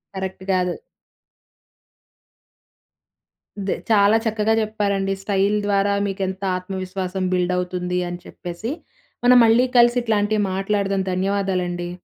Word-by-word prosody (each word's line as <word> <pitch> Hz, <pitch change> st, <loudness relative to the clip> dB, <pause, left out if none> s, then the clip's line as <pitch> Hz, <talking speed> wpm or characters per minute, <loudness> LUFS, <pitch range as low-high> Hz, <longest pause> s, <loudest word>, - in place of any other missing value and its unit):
Correct 190 Hz, 0 st, -5 dB
కాదు. 180 Hz, -1 st, +1 dB, 2.9 s
ద్ -, -, +1 dB, 0.2 s
చాలా 210 Hz, 0 st, +5 dB
చక్కగా 220 Hz, 0 st, +1 dB
చెప్పారండి. 200 Hz, -2 st, -1 dB
స్టైల్ 200 Hz, +1 st, +1 dB
ద్వారా 200 Hz, 0 st, +2 dB
మీకు 195 Hz, 0 st, -4 dB
ఎంత 190 Hz, +1 st, -6 dB
ఆత్మవిశ్వాసం 185 Hz, 0 st, -4 dB
బిల్డ్ 180 Hz, 0 st, +1 dB
అవుతుందని 180 Hz, -1 st, -2 dB
చెప్పేసి. 180 Hz, +7 st, -6 dB, 0.5 s
మనం 250 Hz, 0 st, +7 dB
మళ్ళీ 230 Hz, +3 st, +4 dB
కలిసి 240 Hz, +1 st, +5 dB
ఇట్లాంటివి 215 Hz, -2 st, +1 dB
మాట్లాడదాం. 195 Hz, 0 st, 0 dB
ధన్యవాదాలండి. 185 Hz, -2 st, -1 dB
195 Hz, 100 wpm, -22 LUFS, 185-210 Hz, 2.9 s, మనం